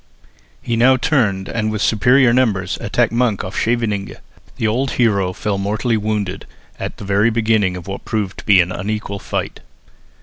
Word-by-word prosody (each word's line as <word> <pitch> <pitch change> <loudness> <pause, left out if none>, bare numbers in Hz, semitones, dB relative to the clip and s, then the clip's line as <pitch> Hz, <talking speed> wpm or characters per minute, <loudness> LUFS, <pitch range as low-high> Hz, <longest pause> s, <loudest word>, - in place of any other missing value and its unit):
He 120 - -1
now 130 +3 +5
turned 105 -9 +1
and 110 -2 -2
with 105 - -3
superior 125 +3 +4
numbers 105 -7 +1
attacked 115 +2 +1
Monk 115 -4 0
off 95 +2 -7
Scheveningen. 110 -4 -1 0.4
The - - -2
old 125 +5 0
hero 100 -6 +2
fell 100 +1 -3
mortally 110 +4 0
wounded 105 -3 -3 0.3
at - - -5
the - - -8
very 100 +3 +3
beginning 110 -5 +1
of 90 - -9
what 95 0 -6
proved 105 -4 -3
to - - -11
be 100 -3 +7
an 90 +1 -2
unequal 100 +1 -4
fight. - - -4
105 Hz, 170 wpm, -18 LUFS, 100-115 Hz, 0.4 s, be